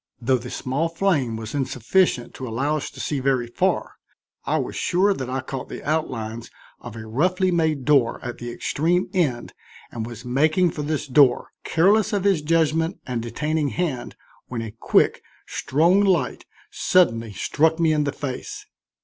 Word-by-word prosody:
Though 130 +1 +1
the 125 +1 -8
small 140 +8 -2
flame 165 - 0
was 110 -1 -7
insufficient 135 - +1
to 130 - -7
allow 135 +7 0
us 150 - -3
to - - -14
see 145 - -2
very 130 -2 +1
far, 120 - -1 0.5
I - - +1
was - - -3
sure 195 +3 +2
that 130 -9 -5
I 130 +1 -2
caught 130 -1 -6
the - - -7
outlines 115 -7 -2 0.3
of 120 -2 -9
a 110 -1 -7
roughly 180 - +1
made 160 -6 0
door 140 -6 +3
at 120 - -5
the 120 - -5
extreme 170 +9 0
end 140 -11 0 0.4
and 115 - -4
was 120 +1 -8
making 155 +8 +2
for 150 - -5
this 150 0 -2
door, 135 -3 +4
careless 205 +6 +3
of 200 -2 0
his 195 -6 +3
judgment 160 +2 +1
and 125 -2 -3
detaining 150 +6 -1
hand, 150 -9 -3 0.3
when 115 -2 -4
a 110 - -6
quick, 115 - +2 0.2
strong 170 +8 +2
light 190 -4 +1 0.3
suddenly 115 -12 +2
struck 160 - +1
me 160 -2 +3
in 150 -1 +2
the 145 - -1
face. 135 -2 -6
145 Hz, 170 wpm, -23 LUFS, 120-165 Hz, 0.5 s, door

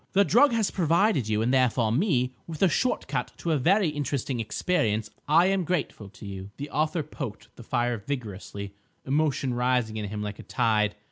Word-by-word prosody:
The 200 +1 +5
drug 250 +8 +5
has 225 -3 +1
provided 170 - +2
you, 110 0 +1
and 125 +3 +1
therefore 125 -3 +3
me, 130 - +1
with 160 0 -3
a - - +7
shortcut 250 - -1
to 170 - -2
a 155 - +3
very 190 +6 +3
interesting 140 -3 -2
experience. 110 - 0 0.2
I 160 +4 +5
am 190 -1 +2
grateful 150 - -2
to 105 - -13
you." 95 -1 -7
The 145 +1 -6
author 155 +2 0
poked 135 -6 -8
the - - -12
fire 120 +1 0
vigorously, 100 -6 -5 0.3
emotion 140 -2 +1
rising 125 -3 0
in 105 - -3
him 105 +1 -4
like 105 -1 -5
a - - -8
tide. 110 -3 +1
130 Hz, 185 wpm, -27 LUFS, 110-165 Hz, 0.3 s, a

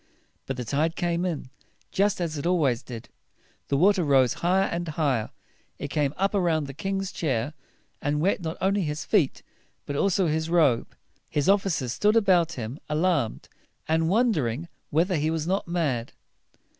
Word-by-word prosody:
But 135 - -3
the 125 - -4
tide 155 +7 0
came 175 0 0
in, 155 -7 -4 0.4
just 200 0 +1
as 165 -3 -2
it 145 +3 -2
always 145 -10 +2
did. 115 -3 -9 0.6
The 140 - +1
water 190 +3 +4
rose 135 -4 +4
higher 185 +3 +3
and 175 -1 -3
higher. 145 -8 0 0.5
It - - -5
came 145 -1 0
up 195 +2 +1
around 170 -6 +1
the 135 - -7
king's 195 +5 -3
chair, 135 -2 -1 0.5
and 145 +1 0
wet 190 +4 +1
not 165 0 -4
only 195 +2 +2
his 150 -2 -3
feet, 180 -11 +1 0.4
but 145 - -4
also 190 +4 +2
his 160 0 0
robe. 155 -9 +2 0.3
His 145 -2 0
officers 190 - +2
stood 210 - +2
about 180 -6 +4
him, 120 +1 -6
alarmed, 150 -6 0 0.4
and 160 +1 +2
won 235 +5 +3
der 150 - 0
ing 140 +10 -4 0.2
whether 170 +4 +2
he 155 +1 +1
was 160 -1 -1
not 190 +2 -1
mad. 145 -9 -1
160 Hz, 170 wpm, -26 LUFS, 140-185 Hz, 0.6 s, water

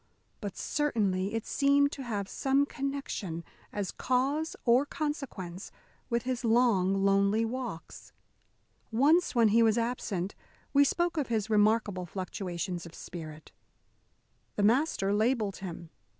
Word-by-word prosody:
But 200 -3 -6
certainly 205 -9 0
it 225 - -2
seemed 285 0 +3
to 275 - -6
have 210 -6 -3
some 275 +5 +1
connection, 275 - -4 0.3
as 200 -3 -3
cause 275 +5 0
or 245 +2 +5
consequence, 270 - -5 0.4
with 235 -2 0
his 255 0 -2
long, 200 -5 +3
lonely 200 +3 +3
walks. 230 -8 -6 0.8
Once, 295 +10 +3
when 230 -2 +5
he 230 +3 +4
was 225 -1 +4
absent, 230 -6 -2 0.4
we 285 0 +7
spoke 345 +4 0
of 290 - 0
his 220 -2 -1
remarkable 210 -3 +2
fluctuations 180 -1 -4
of 165 - -13
spirit. 155 -3 -9 1.0
The 205 - 0
master 220 -3 +2
labelled 215 -1 +1
him. 170 -3 -8
225 Hz, 125 wpm, -30 LUFS, 195-265 Hz, 1.0 s, we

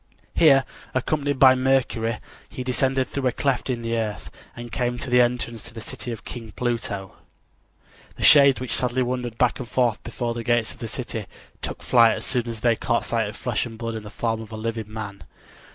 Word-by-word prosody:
Here, 135 -5 +6 0.3
accompanied 145 +1 0
by 130 -1 +8
Mercury, 130 -3 +1 0.3
he 130 - -5
descended 130 +1 +1
through 135 -2 -1
a - - +3
cleft 135 +1 -1
in 120 -2 -2
the 115 0 -1
earth, 105 -4 -3 0.2
and 120 0 -8
came 120 0 -1
to 125 +1 -5
the 125 0 +6
entrance 120 -1 -1
of - - -14
the - - -6
city 120 +2 -6
of 115 - -7
King 115 -3 -8
Pluto. 115 -6 -3 1.0
The - - -6
shades 140 -3 +7
which 125 -1 -2
sadly 125 0 +1
wandered 125 -2 -3
back 125 +1 +2
and 125 -3 -6
forth 120 -4 +1
before 120 0 -3
the 115 0 -5
gates 120 -1 +1
of - - -19
the 115 - -4
city 115 -3 -5 0.3
took - - -5
flight 115 -2 +5
as - - -6
soon 125 -3 -1
as 115 -2 -5
they 120 -1 +4
caught 115 - 0
sight 115 -3 0
of 105 - -9
flesh 120 -1 -1
and 115 -1 -10
blood 115 0 -3
in 110 - -4
the 105 - -9
form 115 +1 -2
of 110 0 -10
a 110 - -6
living 110 -1 -4
man. 105 -3 -6
120 Hz, 215 wpm, -24 LUFS, 115-130 Hz, 1.0 s, by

